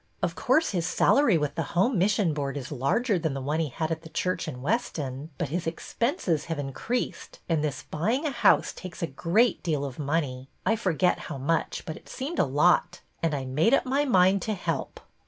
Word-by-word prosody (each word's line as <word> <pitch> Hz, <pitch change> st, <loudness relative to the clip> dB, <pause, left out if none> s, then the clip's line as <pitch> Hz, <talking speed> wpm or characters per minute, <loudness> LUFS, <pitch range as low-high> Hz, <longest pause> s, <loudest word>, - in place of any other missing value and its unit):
Of -, -, +1 dB
course 320 Hz, +1 st, +2 dB
his 175 Hz, -4 st, -1 dB
salary 235 Hz, -, +4 dB
with 150 Hz, -2 st, -1 dB
the 170 Hz, -, -4 dB
Home 235 Hz, +8 st, +3 dB
Mission 195 Hz, -3 st, +2 dB
Board 145 Hz, -1 st, -3 dB
is 130 Hz, 0 st, -6 dB
larger 175 Hz, -, +1 dB
than 160 Hz, -4 st, -1 dB
the -, -, -2 dB
one 145 Hz, +4 st, -1 dB
he 160 Hz, -3 st, 0 dB
had 160 Hz, +5 st, -3 dB
at 160 Hz, -1 st, -2 dB
the 160 Hz, -, -11 dB
church 180 Hz, +2 st, -1 dB
in 125 Hz, -5 st, -6 dB
Weston, 150 Hz, -, -2 dB
but 165 Hz, -, -2 dB
his 170 Hz, +2 st, -2 dB
expenses 175 Hz, -, -1 dB
have 165 Hz, -2 st, -3 dB
in 135 Hz, -2 st, -4 dB
creased, 245 Hz, -, -3 dB
and 160 Hz, -3 st, +1 dB
this 145 Hz, -1 st, -2 dB
buying 225 Hz, -, -1 dB
a 300 Hz, -, 0 dB
house -, -, +3 dB
takes 185 Hz, -2 st, -8 dB
a -, -, +1 dB
great 210 Hz, -, +2 dB
deal 150 Hz, -5 st, -1 dB
of 135 Hz, -1 st, -7 dB
money, 140 Hz, -3 st, -2 dB
— -, -, -40 dB
I 225 Hz, -, +3 dB
forget 185 Hz, -4 st, +1 dB
how 150 Hz, -, -4 dB
much, 160 Hz, +5 st, -1 dB
but 160 Hz, -3 st, -5 dB
it -, -, -16 dB
seemed 285 Hz, +7 st, -4 dB
a -, -, +5 dB
lot, 150 Hz, +6 st, +2 dB
— -, -, -40 dB
and 165 Hz, -3 st, +1 dB
I 135 Hz, -2 st, -3 dB
made 155 Hz, -, +3 dB
up -, -, 0 dB
my 275 Hz, +3 st, +1 dB
mind 190 Hz, -6 st, +4 dB
to 215 Hz, +3 st, -2 dB
help. 180 Hz, -, -3 dB
165 Hz, 225 wpm, -27 LUFS, 145-205 Hz, -, a